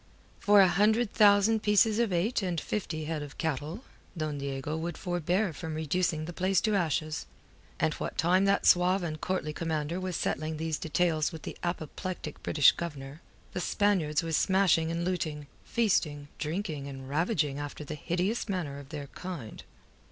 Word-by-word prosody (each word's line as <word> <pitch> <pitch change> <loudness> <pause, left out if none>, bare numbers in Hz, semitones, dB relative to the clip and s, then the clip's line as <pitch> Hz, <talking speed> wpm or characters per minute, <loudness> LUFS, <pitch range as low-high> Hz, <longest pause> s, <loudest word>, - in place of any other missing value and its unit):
For 205 -1 +6
a 190 - +7
hundred 210 +5 +2
thousand 210 +1 +5
pieces 210 +1 +4
of 235 -4 +2
eight 185 +7 +1
and 180 -3 -1
fifty 160 -4 -3
head 155 -1 -3
of 145 -1 -8
cattle, 160 - -3 0.3
Don 155 -2 -2
Diego 140 +2 -3
would 165 +1 -4
forbear 175 +1 0
from 160 +1 -5
reducing 160 0 0
the 175 - -6
place 185 +1 +2
to 215 - +1
ashes. 160 -4 -1 0.5
And - - +2
what - - -5
time 185 +4 +3
that 200 0 +2
suave 180 +1 +5
and 155 -3 -4
courtly 180 -4 -2
commander 160 +1 -2
was 185 -1 -3
settling 155 0 -2
these 160 -1 -2
details 160 -1 +1
with 160 - -9
the - - -6
apoplectic 175 -1 -4
British 145 -2 +5
Governor, 145 -2 -7 0.3
the 180 - -2
Spaniards 175 -7 +1
were 165 - -3
smashing 175 -1 +3
and 170 +1 -2
looting, 155 -5 -2 0.2
feasting, 155 -11 0
drinking, 155 -3 -3
and 135 -1 -8
ravaging 150 -1 0
after 145 +1 -6
the 145 - -6
hideous 180 +9 -1
manner 160 -8 -3
of 140 -1 -12
their 145 -2 -5
kind. 155 -6 -7
165 Hz, 165 wpm, -29 LUFS, 150-185 Hz, 0.5 s, a